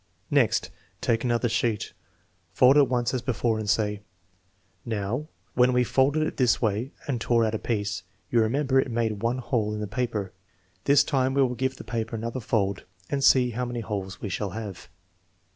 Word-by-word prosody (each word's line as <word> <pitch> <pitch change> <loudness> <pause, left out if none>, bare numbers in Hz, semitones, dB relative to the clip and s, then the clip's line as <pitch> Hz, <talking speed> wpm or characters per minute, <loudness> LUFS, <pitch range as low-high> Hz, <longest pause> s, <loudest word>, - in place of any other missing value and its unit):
Next, 140 -7 +2 0.3
take 115 -1 0
another 120 -1 +1
sheet, 115 -2 -1 0.6
fold 130 +2 +6
it 145 -4 +5
once 120 -1 0
as 130 - -1
before 115 -3 0
and 105 -2 -3
say: 105 -1 +1 0.8
"Now, 115 +5 -3 0.3
when 125 0 +4
we 125 0 +4
folded 140 +5 +2
it - - -4
this 125 -3 +3
way 110 +4 -1 0.2
and 125 -5 -2
tore 115 0 +3
out 110 - -1
a 110 - -1
piece, 100 -5 -2 0.3
you 120 - +4
remember 135 +4 +2
it 130 - 0
made 115 -3 -1
one 115 +2 0
hole 115 -4 -1
in - - -4
the 105 - -2
paper. 105 -3 -3 0.5
This 140 0 +6
time 135 -2 0
we 140 - +5
will 125 -1 0
give 130 +2 -1
the - - -9
paper 115 0 -3
another 115 +3 -3
fold 100 -4 -1 0.3
and 140 -1 0
see 125 -2 +5
how 125 +2 -2
many 120 -1 -4
holes 100 -4 -5
we 105 - -4
shall 100 +2 -2
have.' 100 -6 -7
115 Hz, 190 wpm, -26 LUFS, 110-130 Hz, 0.8 s, fold